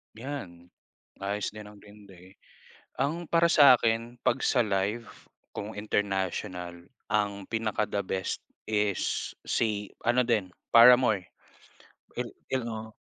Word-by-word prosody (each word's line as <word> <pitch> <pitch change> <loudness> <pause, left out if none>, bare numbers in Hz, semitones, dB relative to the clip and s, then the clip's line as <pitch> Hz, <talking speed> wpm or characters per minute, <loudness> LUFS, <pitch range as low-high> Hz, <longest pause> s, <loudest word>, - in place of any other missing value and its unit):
'Yan. 110 -9 -7 0.6
Ayos 100 +1 -2
din 105 -1 -9
ang 105 - -16
Green 105 +1 -16
Day. 95 -1 -16 0.6
Ang 155 +6 -1
para 170 0 +4
sa 140 -6 +7
akin 115 +2 -1
'pag 130 - +1
sa 120 -4 +2
live 105 +4 -1 0.5
kung 105 0 -6
international, 95 -4 -3 0.2
ang 100 -2 -1
pinaka 110 -2 -1
the 100 0 -2
best 95 -1 -3 0.2
is 105 -3 -1 0.2
si 105 -3 -1
ano 120 +1 +2
din, 105 -6 0 0.2
Paramore. 115 -5 +6 0.9
Il - - -2 0.2
il 130 -2 0
oh. 110 -1 -6
105 Hz, 125 wpm, -28 LUFS, 100-120 Hz, 0.9 s, sa